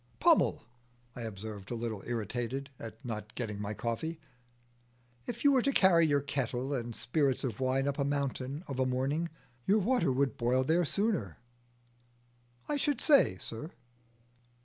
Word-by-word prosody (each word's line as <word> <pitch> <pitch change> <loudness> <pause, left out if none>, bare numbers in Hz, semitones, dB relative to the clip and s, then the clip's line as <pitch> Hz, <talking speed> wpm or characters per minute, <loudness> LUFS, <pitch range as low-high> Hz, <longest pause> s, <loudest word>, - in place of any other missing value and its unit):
"Pummel," - - +4 0.5
I 125 - -6
observed, 105 -2 -6
a 120 - -2
little 115 -3 -3
irritated 120 +4 -3
at 115 +4 -9
not 110 -1 -5
getting 105 -4 -3
my 105 +1 -3
coffee, 155 +10 -3 1.1
"if 235 - -5
you 285 - +7
were 265 -2 +4
to 275 - +2
carry 175 -8 +5
your 145 -1 +3
kettle 135 -1 -2
and 120 -3 -3
spirits 135 0 +1
of 120 -6 -3
wine 135 +1 +1
up 140 +1 -1
a - - +3
mountain 140 +1 -2
of 135 -2 -5
a 130 - +3
morning, 135 +6 0 0.4
your 205 - +5
water 205 - +2
would 135 -1 +1
boil 125 +2 +2
there 165 +5 +2
sooner." 180 - 0 1.3
"I 295 - 0
should 285 -2 0
say, 280 - +5
sir." 115 - -6
135 Hz, 155 wpm, -31 LUFS, 115-160 Hz, 1.3 s, you